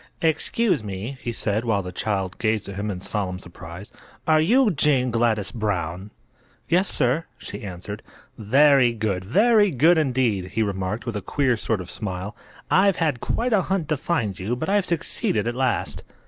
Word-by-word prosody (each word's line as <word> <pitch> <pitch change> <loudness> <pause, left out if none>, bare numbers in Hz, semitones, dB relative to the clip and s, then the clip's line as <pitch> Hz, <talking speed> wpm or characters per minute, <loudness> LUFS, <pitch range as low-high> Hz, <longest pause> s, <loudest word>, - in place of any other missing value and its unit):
"Excuse 165 - +1
me," 105 +6 -6
he 120 - -3
said, 110 -1 -1
while 110 -5 0
the 90 - -6
child 95 -1 -2
gazed 110 -2 0
at 100 - -6
him 100 +2 -3
in 95 -3 -4
solemn 95 -1 -3
surprise. 90 +1 -10 0.3
"Are 155 -1 +4
you 230 +7 +4
Jane 135 -5 +2
Gladys 115 -4 +1
Brown?" 95 -4 -3 0.6
"Yes, 185 +4 +3
sir," 135 +4 +1
she - - -8
answered. 100 +2 -7 0.3
"Very 130 +2 +4
good; 105 -5 -2
very 210 - +4
good, 160 +4 +4
indeed!" 125 -9 +1
he 110 - +2
remarked, 100 +2 -3
with 120 -3 -4
a 105 - -2
queer 130 +5 +1
sort 110 -2 -1
of 90 - -9
smile. 95 0 -5 0.4
"I've 195 0 +5
had 150 -8 0
quite 240 0 -1
a 205 - +4
hunt 180 -4 -2
to 155 - +2
find 125 - -1
you, 105 +6 -2
but 160 +9 -3
I've 200 -2 +2
succeeded 140 -9 0
at 120 - -1
last." 130 +1 -1
115 Hz, 175 wpm, -23 LUFS, 100-155 Hz, 0.6 s, I've